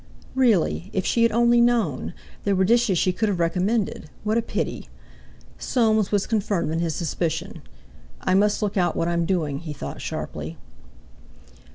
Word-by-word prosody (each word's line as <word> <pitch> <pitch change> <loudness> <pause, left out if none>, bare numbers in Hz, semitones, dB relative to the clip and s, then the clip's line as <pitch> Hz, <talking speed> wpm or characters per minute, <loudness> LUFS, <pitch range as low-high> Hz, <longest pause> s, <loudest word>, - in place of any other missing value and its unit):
Really! 220 -8 +2
If 190 - -1
she 235 - +1
had 230 -1 +4
only 235 +1 +4
known! 220 - +1 0.3
There 200 -1 +1
were 190 0 +3
dishes 230 -3 +3
she 185 +2 +2
could 220 +3 0
have 190 -4 -1
recommended; 180 +1 0
what 215 +1 0
a 230 - +3
pity! 230 - -4 0.7
Soames 220 -4 +2
was 205 -2 +2
confirmed 200 -7 0
in 165 - -1
his 165 -2 -1
suspicion. 170 +2 -3 0.6
"I 185 - 0
must 205 +2 +3
look 205 -1 -1
out 175 -3 +2
what 165 - 0
I'm 170 -1 +1
doing!" 155 -7 0
he 155 -2 -6
thought 70 - -7
sharply. 80 +2 -5
190 Hz, 165 wpm, -24 LUFS, 170-220 Hz, 0.7 s, had